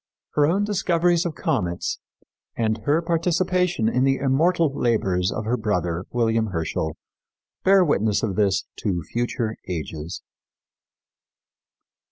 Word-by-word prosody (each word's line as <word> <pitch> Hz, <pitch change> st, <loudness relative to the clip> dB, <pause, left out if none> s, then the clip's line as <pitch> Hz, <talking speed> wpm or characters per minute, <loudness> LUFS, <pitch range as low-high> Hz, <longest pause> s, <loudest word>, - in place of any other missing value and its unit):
Her 145 Hz, -1 st, +4 dB
own 190 Hz, +6 st, +2 dB
discoveries 175 Hz, -3 st, +1 dB
of 165 Hz, -, -6 dB
comets 85 Hz, -1 st, -1 dB, 0.6 s
and 110 Hz, -1 st, 0 dB
her 155 Hz, +4 st, +2 dB
participation 175 Hz, -4 st, +1 dB
in 125 Hz, +3 st, +2 dB
the 135 Hz, 0 st, +3 dB
immortal 155 Hz, +3 st, +2 dB
labors 95 Hz, -8 st, +1 dB
of 110 Hz, -, -4 dB
her 120 Hz, +3 st, 0 dB
brother, 90 Hz, -5 st, -1 dB
William 115 Hz, -2 st, +1 dB
Herschel, 80 Hz, -3 st, -3 dB, 0.7 s
bear 190 Hz, -1 st, +5 dB
witness 110 Hz, -, +1 dB
of 100 Hz, -4 st, -1 dB
this 100 Hz, -2 st, +2 dB
to 90 Hz, -6 st, -2 dB
future 115 Hz, -, -2 dB
ages." 80 Hz, -2 st, -5 dB
115 Hz, 120 wpm, -23 LUFS, -, 0.7 s, bear